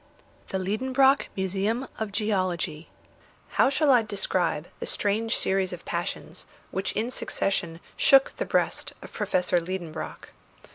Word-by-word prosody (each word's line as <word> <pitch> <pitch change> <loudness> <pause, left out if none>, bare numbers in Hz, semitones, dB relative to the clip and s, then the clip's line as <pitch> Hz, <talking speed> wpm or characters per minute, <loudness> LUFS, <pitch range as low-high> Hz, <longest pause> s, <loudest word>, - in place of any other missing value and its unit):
THE 190 - -2
LIEDENBROCK 260 +8 +3
MUSEUM 200 +7 0
OF 220 -2 -2
GEOLOGY 185 -6 -1 0.6
How - - +4
shall 285 +1 +3
I 245 -3 +6
describe 190 -6 -1
the - - -4
strange 220 +2 0
series 190 -1 +1
of 180 -1 -8
passions 175 +2 -4 0.2
which 190 0 -1
in 225 +4 -1
succession 170 -8 -1 0.2
shook 270 -1 +5
the - - -1
breast - - 0
of - - -11
Professor 180 -1 +1
Liedenbrock? 175 -2 -5
195 Hz, 130 wpm, -27 LUFS, 180-225 Hz, 0.6 s, I